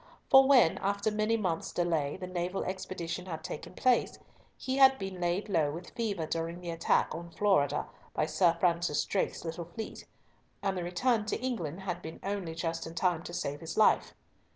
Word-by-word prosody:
For 270 Hz, 0 st, +9 dB
when, 255 Hz, -12 st, +5 dB
after 200 Hz, +2 st, 0 dB
many 215 Hz, +2 st, +1 dB
months' 180 Hz, -6 st, -2 dB
delay, 165 Hz, -5 st, 0 dB
the 190 Hz, -, -6 dB
naval 180 Hz, +1 st, -2 dB
expedition 185 Hz, -1 st, -4 dB
had 160 Hz, -3 st, -5 dB
taken 155 Hz, -, -7 dB
place, 255 Hz, -1 st, +2 dB, 0.4 s
he 260 Hz, +1 st, -2 dB
had 265 Hz, -1 st, +7 dB
been 195 Hz, -3 st, -6 dB
laid 175 Hz, +4 st, 0 dB
low 160 Hz, -7 st, +2 dB
with 170 Hz, +5 st, -7 dB
fever 210 Hz, -9 st, -2 dB
during 165 Hz, +2 st, -3 dB
the 175 Hz, -1 st, -5 dB
attack 165 Hz, 0 st, +1 dB
on 170 Hz, +1 st, -7 dB
Florida 190 Hz, -6 st, +2 dB, 0.3 s
by 155 Hz, -, +2 dB
Sir 170 Hz, +2 st, +3 dB
Francis 170 Hz, -4 st, +1 dB
Drake's 195 Hz, -, -1 dB
little 165 Hz, +1 st, -4 dB
fleet; 220 Hz, +6 st, -8 dB, 0.6 s
and 195 Hz, -1 st, 0 dB
the 180 Hz, -, -2 dB
return 215 Hz, +5 st, +1 dB
to -, -, -1 dB
England 195 Hz, -, -3 dB
had 185 Hz, -2 st, -4 dB
been 160 Hz, +1 st, -8 dB
only 195 Hz, -5 st, -3 dB
just 165 Hz, -1 st, -3 dB
in 165 Hz, -, -9 dB
time 175 Hz, -2 st, +1 dB
to 175 Hz, -, -8 dB
save 145 Hz, -2 st, -3 dB
his 165 Hz, 0 st, -6 dB
life. 215 Hz, -, +4 dB
180 Hz, 185 wpm, -31 LUFS, 165-200 Hz, 0.6 s, For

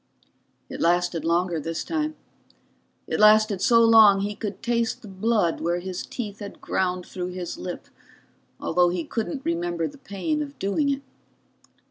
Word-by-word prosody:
It -, -, -7 dB
lasted 175 Hz, -1 st, +1 dB
longer 170 Hz, 0 st, +1 dB
this 165 Hz, +2 st, -4 dB
time. 310 Hz, -1 st, -2 dB, 0.9 s
It -, -, -2 dB
lasted 215 Hz, -2 st, +5 dB
so 230 Hz, +1 st, +5 dB
long 215 Hz, -3 st, +7 dB
he 205 Hz, +1 st, -2 dB
could 205 Hz, -1 st, -6 dB
taste 235 Hz, -1 st, -1 dB
the -, -, -9 dB
blood 195 Hz, -2 st, 0 dB
where 170 Hz, +1 st, 0 dB
his 185 Hz, 0 st, -5 dB
teeth 210 Hz, -5 st, -6 dB
had 205 Hz, -1 st, -8 dB
ground 180 Hz, -1 st, -1 dB
through 180 Hz, -1 st, -5 dB
his 180 Hz, -2 st, -5 dB
lip, 180 Hz, -1 st, -6 dB, 0.7 s
although 175 Hz, +1 st, +2 dB
he 175 Hz, -1 st, -2 dB
couldn't 250 Hz, -, -4 dB
remember 170 Hz, -1 st, -1 dB
the 285 Hz, -, -12 dB
pain 280 Hz, +8 st, -2 dB
of 285 Hz, -1 st, -6 dB
doing 200 Hz, +9 st, 0 dB
it. 275 Hz, 0 st, -2 dB
195 Hz, 155 wpm, -25 LUFS, 175-225 Hz, 0.9 s, long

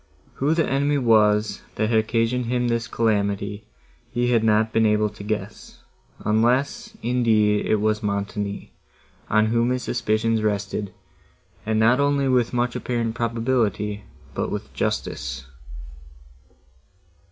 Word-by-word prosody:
Who 150 Hz, +4 st, +1 dB
the 165 Hz, -, +1 dB
enemy 140 Hz, +2 st, +1 dB
was, 110 Hz, -4 st, +3 dB
that 110 Hz, +1 st, 0 dB
had 110 Hz, -, +4 dB
occasioned 115 Hz, +2 st, 0 dB
him 125 Hz, 0 st, 0 dB
this 115 Hz, -1 st, -1 dB
calamity, 100 Hz, -2 st, -1 dB, 0.4 s
he 120 Hz, +1 st, 0 dB
had 115 Hz, -2 st, +3 dB
not 110 Hz, 0 st, +2 dB
been 110 Hz, -1 st, +3 dB
able 105 Hz, 0 st, +2 dB
to 105 Hz, 0 st, -11 dB
guess, 105 Hz, -1 st, -5 dB, 0.4 s
unless, 130 Hz, -, +1 dB
indeed, 110 Hz, -4 st, +2 dB
it -, -, +3 dB
was 110 Hz, 0 st, 0 dB
Montoni, 100 Hz, 0 st, -3 dB, 0.6 s
on 110 Hz, +1 st, +3 dB
whom 115 Hz, +2 st, +1 dB
his 125 Hz, 0 st, -1 dB
suspicions 115 Hz, -1 st, 0 dB
rested, 100 Hz, -1 st, -2 dB, 0.8 s
and 110 Hz, 0 st, +1 dB
not 120 Hz, +4 st, +4 dB
only 140 Hz, -1 st, +2 dB
with 125 Hz, -3 st, +2 dB
much 120 Hz, 0 st, -1 dB
apparent 115 Hz, -2 st, -2 dB
probability, 115 Hz, -3 st, -1 dB, 0.3 s
but -, -, -2 dB
with -, -, -5 dB
justice. 60 Hz, 0 st, -3 dB
110 Hz, 130 wpm, -23 LUFS, 105-120 Hz, 0.8 s, had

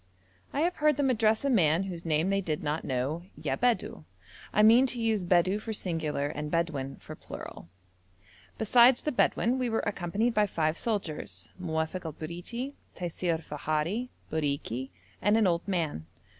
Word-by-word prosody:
I 285 Hz, -, -1 dB
have 350 Hz, +2 st, +1 dB
heard 300 Hz, -2 st, +3 dB
them 275 Hz, -2 st, +3 dB
address 220 Hz, +1 st, +2 dB
a -, -, +2 dB
man 170 Hz, -5 st, +4 dB
whose 175 Hz, -3 st, -6 dB
name 160 Hz, +4 st, +2 dB
they 195 Hz, 0 st, +2 dB
did 155 Hz, -5 st, -2 dB
not 150 Hz, +2 st, -1 dB
know 135 Hz, +6 st, -1 dB, 0.2 s
'Ya 140 Hz, -4 st, -1 dB
Bedou.' 210 Hz, -, 0 dB, 0.5 s
I 210 Hz, -, +4 dB
mean 235 Hz, +5 st, +7 dB
to 245 Hz, -1 st, -1 dB
use 220 Hz, -4 st, +1 dB
Bedou 180 Hz, +3 st, +3 dB
for 220 Hz, +1 st, -5 dB
singular 160 Hz, -7 st, -1 dB
and 150 Hz, +1 st, -4 dB
Bedouin 150 Hz, -5 st, -1 dB
for -, -, -10 dB
plural. 85 Hz, -, -9 dB, 0.9 s
Besides 240 Hz, +3 st, +5 dB
the 300 Hz, -, 0 dB
Bedouin 250 Hz, -1 st, +2 dB
we 250 Hz, -1 st, 0 dB
were 225 Hz, -, 0 dB
accompanied 205 Hz, +4 st, 0 dB
by 210 Hz, -1 st, +3 dB
five 155 Hz, -4 st, 0 dB
soldiers, 195 Hz, -8 st, -3 dB
Muofok 160 Hz, +1 st, -2 dB
el 160 Hz, -, -4 dB
Briti, 175 Hz, -, -5 dB, 0.2 s
Taisir 175 Hz, -1 st, -1 dB
i -, -, -12 dB
Fahari, 155 Hz, -, -2 dB, 0.2 s
Bariki, 140 Hz, -4 st, -2 dB, 0.3 s
and 205 Hz, +3 st, +4 dB
an 225 Hz, -, +4 dB
old 170 Hz, 0 st, +1 dB
man. 160 Hz, -, -1 dB
180 Hz, 170 wpm, -29 LUFS, 155-225 Hz, 0.9 s, mean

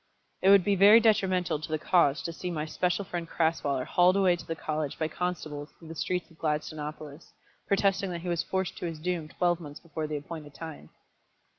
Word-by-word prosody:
It 190 Hz, -, +4 dB
would 200 Hz, -2 st, +7 dB
be 205 Hz, -, +2 dB
very 205 Hz, +4 st, +8 dB
detrimental 185 Hz, -8 st, +2 dB
to 155 Hz, -, -7 dB
the 155 Hz, -, 0 dB
cause 155 Hz, -2 st, +2 dB
to 170 Hz, -, -4 dB
see 180 Hz, +2 st, -5 dB
my 155 Hz, -3 st, -2 dB
special 180 Hz, +4 st, -1 dB
friend 170 Hz, -2 st, -5 dB
Crasweller 145 Hz, -5 st, 0 dB
hauled 180 Hz, +1 st, +4 dB
away 190 Hz, -3 st, +4 dB
to 165 Hz, -2 st, -11 dB
the 165 Hz, -, -2 dB
college 155 Hz, -2 st, -3 dB
by 155 Hz, -, 0 dB
constables 155 Hz, -3 st, -4 dB
through 165 Hz, -, -13 dB
the -, -, -6 dB
streets 170 Hz, +4 st, -2 dB
of 165 Hz, -, -21 dB
Gladstonopolis, 150 Hz, 0 st, -4 dB, 0.3 s
protesting 195 Hz, -1 st, +2 dB
that 170 Hz, -1 st, -4 dB
he 180 Hz, -, -7 dB
was 170 Hz, -2 st, +1 dB
forced 190 Hz, -1 st, -3 dB
to 175 Hz, -, -3 dB
his 165 Hz, -2 st, -5 dB
doom 170 Hz, 0 st, -2 dB
twelve 175 Hz, +2 st, 0 dB
months 150 Hz, -3 st, -9 dB
before 160 Hz, -2 st, -5 dB
the 150 Hz, 0 st, -3 dB
appointed 145 Hz, 0 st, -8 dB
time. 160 Hz, -1 st, -9 dB
165 Hz, 205 wpm, -28 LUFS, 155-180 Hz, 0.3 s, very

